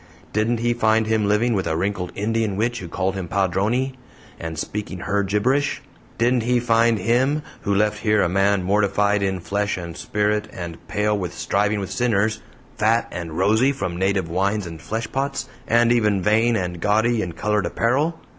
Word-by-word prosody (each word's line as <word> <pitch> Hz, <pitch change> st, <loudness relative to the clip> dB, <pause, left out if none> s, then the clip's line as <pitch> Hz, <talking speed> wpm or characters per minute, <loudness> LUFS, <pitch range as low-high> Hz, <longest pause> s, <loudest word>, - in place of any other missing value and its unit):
Didn't 115 Hz, +2 st, +1 dB
he 120 Hz, 0 st, +2 dB
find 110 Hz, -1 st, +2 dB
him 110 Hz, -1 st, +1 dB
living 110 Hz, +4 st, +2 dB
with 95 Hz, -4 st, -1 dB
a 80 Hz, -1 st, 0 dB
wrinkled 90 Hz, 0 st, -2 dB
Indian 110 Hz, 0 st, -1 dB
witch 120 Hz, +4 st, -1 dB
who 90 Hz, -, -7 dB
called 95 Hz, +3 st, -1 dB
him 95 Hz, -3 st, -4 dB
'Padrone' 100 Hz, +9 st, 0 dB, 0.4 s
and 80 Hz, -1 st, -5 dB
speaking 95 Hz, +1 st, -4 dB
her 100 Hz, +1 st, 0 dB
gibberish? 130 Hz, +9 st, 0 dB, 0.3 s
Didn't 120 Hz, +1 st, +2 dB
he 120 Hz, +2 st, +2 dB
find 115 Hz, -1 st, +3 dB
him, 130 Hz, +9 st, +1 dB, 0.2 s
who 100 Hz, -2 st, 0 dB
left 105 Hz, +1 st, +1 dB
here 105 Hz, -2 st, +2 dB
a -, -, +2 dB
man 95 Hz, +1 st, +2 dB
mortified 100 Hz, +1 st, +2 dB
in 95 Hz, -1 st, -1 dB
flesh 100 Hz, +3 st, -1 dB
and 85 Hz, -2 st, -6 dB
spirit 105 Hz, +2 st, -1 dB
and 85 Hz, -2 st, -8 dB
pale 105 Hz, 0 st, 0 dB
with 90 Hz, -4 st, -4 dB
striving 105 Hz, +4 st, 0 dB
with 95 Hz, -, -5 dB
sinners, 110 Hz, -2 st, +1 dB, 0.4 s
fat 115 Hz, +2 st, +2 dB
and 85 Hz, -3 st, -6 dB
rosy 110 Hz, +6 st, +3 dB
from 90 Hz, -11 st, -3 dB
native 95 Hz, -1 st, 0 dB
wines 100 Hz, +4 st, 0 dB
and 80 Hz, -1 st, -8 dB
fleshpots, 135 Hz, +5 st, -3 dB, 0.2 s
and 120 Hz, +1 st, +4 dB
even 105 Hz, -4 st, +3 dB
vain 115 Hz, +3 st, +3 dB
and 90 Hz, -3 st, -2 dB
gaudy 110 Hz, +3 st, +2 dB
in 85 Hz, -4 st, -4 dB
colored 105 Hz, +3 st, 0 dB
apparel? 145 Hz, +8 st, 0 dB
105 Hz, 175 wpm, -22 LUFS, 95-115 Hz, 0.4 s, and